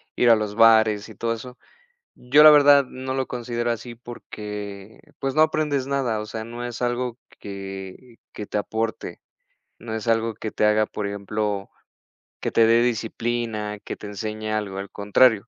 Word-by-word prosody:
ir 120 - +4
a 115 - +8
los 105 -1 -3
bares 110 -2 +5
y 110 - -12
todo 115 +3 -1
eso. 125 +2 -9 0.6
Yo, 140 +5 +5
la 155 - +11
verdad, 145 -1 +7
no 130 +1 -6
lo 130 0 -1
considero 120 -1 -2
así, 120 +1 -6
porque, 105 -3 -8 0.2
pues, 135 -1 -2
no 155 - +3
aprendes 150 -4 +1
nada, 135 -6 0
o 105 - -5
sea, 110 0 -6
no 120 +2 -6
es 120 0 -6
algo 120 0 -1 0.2
que 95 +4 -8 0.2
que 105 - -6
te 105 - -3
aporte, 110 +1 -3 0.6
no 110 0 -6
es 110 +1 -4
algo 115 0 +1
que 110 +1 -5
te - - 0
haga, 105 0 +3
por 105 - -4
ejemplo, 100 0 -3 0.7
que - - -2
te 115 - +5
dé 115 +1 +5
disciplina, 115 -2 -2
que - - -7
te - - -9
enseñe 110 +1 -5
algo, 105 -3 -2
al 100 0 -5
contrario. 105 +2 +3
115 Hz, 180 wpm, -23 LUFS, 105-120 Hz, 0.7 s, la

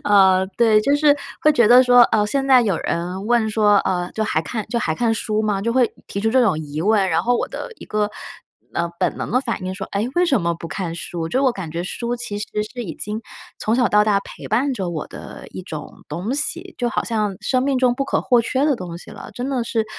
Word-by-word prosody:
呃， 190 -2 +5
对。 220 -3 +5
就 280 +6 +2
是 290 -1 +4 0.3
会 305 - +5
觉 240 -6 +4
得 250 +1 +8
说， 245 -1 +7
呃， 210 -2 +2
现 270 +5 -1
在 260 -2 +7
有 195 -7 +1
人 180 +4 -3
问 235 -2 +2
说， 210 -1 +4
呃， 180 -2 -1
就 220 - -1
还 160 - 0
看 215 +5 -4
就 235 - -1
还 160 -8 -1
看 230 +4 +1
书 215 -1 -1
吗？ 205 -2 0
就 230 - 0
会 250 -2 +2
提 200 - -4
出 220 +1 +1
这 260 +1 +4
种 185 -9 +2
疑 150 0 -5
问， 200 0 +3
然 165 +1 +2
后 245 +4 +2
我 - - -2
的 - - -7
一 - - -11
个， 210 0 -1 0.6
呃， 170 0 0
本 - - 0
能 - - -4
的 250 +3 +2
反 230 -7 -4
应 185 0 -3
说： 190 -1 -6
“诶， 210 +5 -1
为 355 +1 +3
什 265 - +2
么 170 0 0
不 165 0 -8
看 175 -2 -4
书？” 170 -1 -4
就 260 +7 0
我 260 -3 +3
感 180 -7 -6
觉 170 +2 -3
书 235 +6 -3
其 210 -4 -5
实 210 - -4 0.3
是 245 -2 -5
已 165 - -6
经 210 +6 -4 0.4
从 220 - 0
小 245 -5 +3
到 210 0 +4
大 200 -2 +2
陪 - - -11
伴 260 +6 +1
着 190 -6 -3
我 160 -3 -4
的 - - -10
一 - - -8
种 - - -9
东 185 - -3
西， 345 +5 -2
就 240 -1 0
好 - - -1
像 210 -4 -1
生 255 -1 +1
命 275 -1 +1
中 250 -1 +3
不 275 +2 -2
可 - - 0
或 245 -2 +3
缺 260 +4 0
的 290 -4 +2
东 175 -3 -7
西 - - -13
了， - - -10
真 250 +2 -4
的 250 -4 -1
是 225 -1 -1
215 Hz, 275 characters per minute, -21 LUFS, 190-245 Hz, 0.6 s, 得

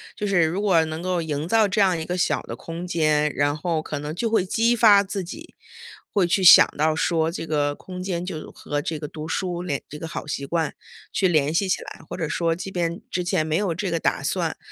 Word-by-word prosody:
就 210 - -3
是 195 -3 +3
如 165 +5 -1
果 190 -6 +3
能 160 +1 -5
够 180 -1 0
营 155 -1 -3
造 220 +2 +4
这 195 +2 -1
样 190 -3 +4
一 - - -3
个 180 +3 -3
小 - - +1
的 - - -7
空 170 +2 -7
间， 155 -3 +2
然 145 +1 +1
后 165 0 -1
可 150 -2 -5
能 150 +2 -5
就 230 +6 -1
会 220 -4 +2
激 230 +5 +2
发 210 -3 +6
自 195 -1 -4
己， 320 - -10 0.6
会 200 -4 +2
去 185 +2 +1
想 175 - +10
到 155 0 +2
说 160 0 +1
这 170 - -5
个 145 -2 0
空 180 +3 -9
间 180 -2 -3
就 170 -4 -6
和 145 0 -4
这 160 +1 -3
个 150 0 -6
读 155 +1 -7
书 175 0 -2
联 145 -6 -2
这 150 +1 -9
个 165 - -5
好 - - -6
习 140 -2 -4
惯 165 0 -1 0.4
去 190 - +2
联 155 -3 +2
系 190 +3 +1
起 - - 0
来， - - -10
或 - - -5
者 160 - -2
说 165 +1 0
即 190 +2 -7
便 170 -2 -2
之 180 - -1
前 175 -3 0
没 155 0 -1
有 185 -3 0
这 185 +1 -3
个 165 - 0
打 - - 0
算， - - -1
170 Hz, 265 characters per minute, -23 LUFS, 155-185 Hz, 0.6 s, 想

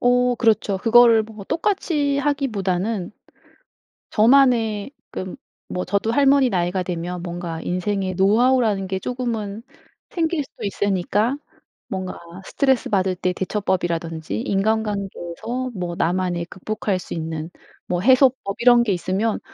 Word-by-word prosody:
어 245 0 +3
그렇죠. 215 -4 +2
그거를 230 +1 +6
뭐 215 -2 -11
똑같이 310 - 0
하기보다는 215 -9 -1 1.0
저만의 230 -2 +3 0.2
그 185 0 -6 0.3
뭐 180 - -3
저도 205 +3 0
할머니 275 -1 +4
나이가 180 -1 -1
되면 175 0 -4
뭔가 170 -2 -5
인생의 185 +1 -2
노하우라는 215 +1 +3
게 190 0 -3
쪼금은 230 -4 -4 0.5
생길 325 -3 -1
수도 - - -15
있으니까 205 +5 0 0.5
뭔가 185 -1 -5 0.2
스트레스 265 +1 +1
받을 190 -2 +1
때 180 0 -1
대처법이라든지 175 -4 -2
인간관계에서 210 +1 -2
뭐 175 -2 -4
나만의 175 0 0
극복할 190 +1 -3
수 - - -7
있는 160 0 -4 0.4
뭐 175 -1 -1
해소법 255 -2 +3
이런 240 -1 +6
게 210 - +1
있으면 190 +5 -1
205 Hz, 290 characters per minute, -22 LUFS, 185-245 Hz, 1.0 s, 그거를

